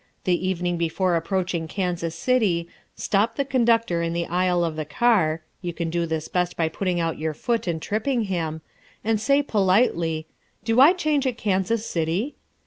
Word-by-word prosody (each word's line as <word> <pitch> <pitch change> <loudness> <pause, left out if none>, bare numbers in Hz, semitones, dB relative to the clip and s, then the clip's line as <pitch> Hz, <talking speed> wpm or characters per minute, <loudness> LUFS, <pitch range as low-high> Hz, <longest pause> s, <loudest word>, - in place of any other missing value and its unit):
The 185 0 +1
evening 175 -1 -1
before 170 +2 +1
approaching 175 -1 -1
Kansas 175 -2 -2
City, 190 -6 +1 0.3
stop 215 +3 +1
the 280 - 0
conductor 230 -9 +2
in 165 0 -1
the 170 0 -1
aisle 180 0 +1
of 160 -2 -3
the 155 - -2
car 160 -2 +2 0.2
(you 175 -2 -4
can 165 -1 -3
do 170 0 0
this 160 -1 -3
best 180 -1 -1
by 160 -1 +1
putting 180 +1 -1
out 165 -2 -1
your 155 -1 -2
foot 230 - -1
and 165 -2 -1
tripping 225 - -1
him), 165 -5 -3 0.4
and 220 -1 +1
say 275 +5 +3
politely, 185 - +1 0.4
"Do 225 +2 +2
I 305 +6 +8
change 305 -6 0
at 250 -3 -2
Kansas 205 +3 0
City?" 170 - -1
180 Hz, 175 wpm, -24 LUFS, 165-225 Hz, 0.4 s, I